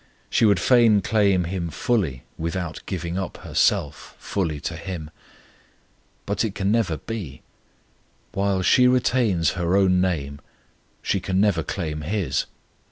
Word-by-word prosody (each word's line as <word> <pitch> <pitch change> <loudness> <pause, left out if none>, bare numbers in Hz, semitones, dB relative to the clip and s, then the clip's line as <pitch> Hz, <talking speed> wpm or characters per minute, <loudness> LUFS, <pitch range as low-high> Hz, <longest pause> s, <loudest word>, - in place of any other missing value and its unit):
She - - +3
would 100 -4 +4
fain 115 -1 +5
claim 100 -2 +2
him 85 0 -3
fully, 80 - -1
without 85 0 -4
giving 90 -1 -3
up 95 - -5
herself 75 0 0
fully 80 -7 -2
to - - -4
him; 80 -5 -6 1.1
but 100 +1 -1
it 105 -3 -3
can 100 0 0
never 105 -8 +1
be: 100 -11 -7 0.9
while 100 -1 0
she 125 +7 +5
retains 120 -9 +2
her 90 +1 0
own 90 -2 +3
name, 70 -6 -2 0.6
she 100 - 0
can 95 +1 -1
never 100 -5 +3
claim 75 -3 -4
his. 95 +3 -1
95 Hz, 135 wpm, -23 LUFS, 85-105 Hz, 1.1 s, fain